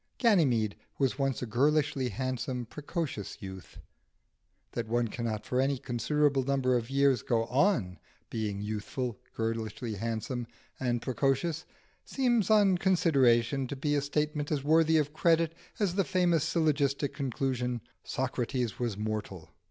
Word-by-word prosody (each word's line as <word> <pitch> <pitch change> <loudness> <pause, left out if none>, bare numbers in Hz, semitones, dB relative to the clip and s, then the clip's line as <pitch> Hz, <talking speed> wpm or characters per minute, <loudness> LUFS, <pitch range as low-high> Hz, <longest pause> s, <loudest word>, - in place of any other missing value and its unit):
Ganymede 135 - +3 0.2
was 135 0 0
once 135 -2 0
a - - -1
girlishly 140 +2 +1
handsome 130 -1 -3
precocious 145 - -5
youth. 95 -4 -9 0.9
That 115 -1 -3
one 120 0 +1
cannot 110 -2 -3
for 125 +1 +1
any 135 +1 +1
considerable 140 +3 +1
number 130 -1 +1
of 120 0 -1
years 135 -3 +3
go 115 -1 +1
on 130 - +1 0.3
being 105 -3 -2
youthful, 110 +3 -3 0.2
girlishly 115 0 -3
handsome, 115 +3 -3 0.3
and 120 -2 -1
precocious, 135 +6 0 0.4
seems 240 -7 +1
on 200 -4 +5
consideration 135 -8 +3
to 140 - -4
be 145 +2 -1
a 145 - +2
statement 150 +1 -1
as 145 -3 0
worthy 160 +1 +4
of 150 -1 0
credit 165 0 +3 0.2
as 200 -5 +1
the 195 +1 +2
famous 175 -4 +2
syllogistic 145 -3 +1
conclusion, 125 -2 -2 0.2
"Socrates 125 -2 -2
was 120 -5 -1
mortal." 105 -5 -4
135 Hz, 135 wpm, -30 LUFS, 115-150 Hz, 0.9 s, on